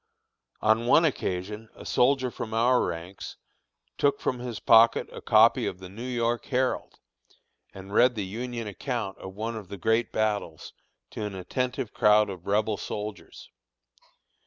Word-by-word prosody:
On 110 Hz, +2 st, +2 dB
one 160 Hz, +6 st, +5 dB
occasion 105 Hz, -, -3 dB
a -, -, -12 dB
soldier 130 Hz, 0 st, +2 dB
from 110 Hz, -1 st, -5 dB
our 125 Hz, +2 st, +3 dB
ranks 85 Hz, +3 st, -6 dB, 0.6 s
took 140 Hz, -1 st, +2 dB
from 125 Hz, -, -2 dB
his 120 Hz, -3 st, -5 dB
pocket 115 Hz, +1 st, +5 dB
a -, -, -9 dB
copy -, -, +4 dB
of 90 Hz, -, -4 dB
the 95 Hz, -1 st, -10 dB
New 105 Hz, +5 st, -10 dB
York 120 Hz, -1 st, -1 dB
Herald, 130 Hz, -1 st, -1 dB, 0.7 s
and 95 Hz, +1 st, -11 dB
read 125 Hz, +3 st, +4 dB
the 105 Hz, -3 st, -3 dB
Union 120 Hz, +4 st, -5 dB
account 110 Hz, -1 st, -4 dB
of 95 Hz, 0 st, -9 dB
one 115 Hz, +3 st, -4 dB
of 105 Hz, -4 st, -7 dB
the 100 Hz, -, -8 dB
great 110 Hz, +4 st, +1 dB
battles 105 Hz, -7 st, -2 dB, 0.4 s
to -, -, -5 dB
an 105 Hz, -2 st, -4 dB
attentive 125 Hz, +5 st, -3 dB
crowd 105 Hz, -1 st, +4 dB
of 90 Hz, -2 st, -10 dB
Rebel 105 Hz, +1 st, +1 dB
soldiers. 105 Hz, 0 st, -7 dB
110 Hz, 155 wpm, -27 LUFS, 100-120 Hz, 0.7 s, one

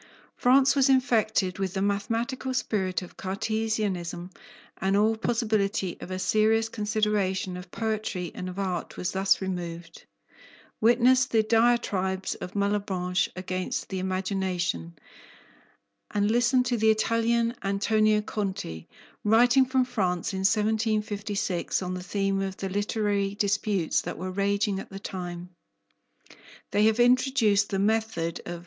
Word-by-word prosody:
France 265 Hz, +2 st, +4 dB
was 275 Hz, -1 st, +4 dB
infected 220 Hz, -8 st, +2 dB
with 190 Hz, -1 st, -2 dB
the -, -, 0 dB
mathematical 230 Hz, +6 st, -1 dB
spirit 190 Hz, -7 st, -1 dB
of 180 Hz, -, -13 dB
Cartesianism 195 Hz, -3 st, -2 dB, 0.5 s
and 195 Hz, +2 st, +1 dB
all 215 Hz, +2 st, +3 dB
possibility 215 Hz, -5 st, 0 dB
of -, -, -7 dB
a 185 Hz, -, -3 dB
serious 220 Hz, +3 st, +2 dB
consideration 210 Hz, -4 st, -1 dB
of 180 Hz, 0 st, -9 dB
poetry 215 Hz, -4 st, -3 dB
and 185 Hz, -, -5 dB
of 180 Hz, -, -8 dB
art 185 Hz, -3 st, -3 dB
was 180 Hz, -, -2 dB
thus 190 Hz, +1 st, +2 dB
removed. 170 Hz, -2 st, -6 dB, 0.7 s
Witness 250 Hz, +3 st, +4 dB
the 220 Hz, -3 st, +2 dB
diatribes 215 Hz, -5 st, +1 dB
of 180 Hz, -, -8 dB
Malebranche 195 Hz, -3 st, 0 dB
against 185 Hz, 0 st, -3 dB
the 190 Hz, -, -3 dB
imagination, 185 Hz, -, -2 dB, 1.1 s
and 205 Hz, +1 st, +1 dB
listen 240 Hz, +2 st, +3 dB
to 245 Hz, -1 st, 0 dB
the 220 Hz, 0 st, +3 dB
Italian, 230 Hz, +1 st, +2 dB
Antonio 210 Hz, +2 st, +2 dB
Conti, 190 Hz, -, -4 dB, 0.4 s
writing 245 Hz, +5 st, +5 dB
from 260 Hz, 0 st, +2 dB
France 185 Hz, -7 st, -1 dB
in 190 Hz, -, -3 dB
1756 210 Hz, -2 st, 0 dB
on 180 Hz, 0 st, -3 dB
the 180 Hz, -, -4 dB
theme 195 Hz, +1 st, -1 dB
of 195 Hz, -1 st, -4 dB
the 195 Hz, -, -4 dB
literary 205 Hz, 0 st, -1 dB
disputes 200 Hz, -3 st, 0 dB
that -, -, -6 dB
were 185 Hz, +2 st, -4 dB
raging 200 Hz, +1 st, 0 dB
at -, -, -9 dB
the 195 Hz, -, -8 dB
time: 180 Hz, -2 st, -6 dB, 1.2 s
"They 210 Hz, +1 st, +3 dB
have 220 Hz, +1 st, +3 dB
introduced 240 Hz, -4 st, +3 dB
the 195 Hz, -, -1 dB
method 200 Hz, -5 st, 0 dB
of 175 Hz, -, -4 dB
M. -, -, -8 dB
205 Hz, 135 wpm, -27 LUFS, 185-220 Hz, 1.2 s, writing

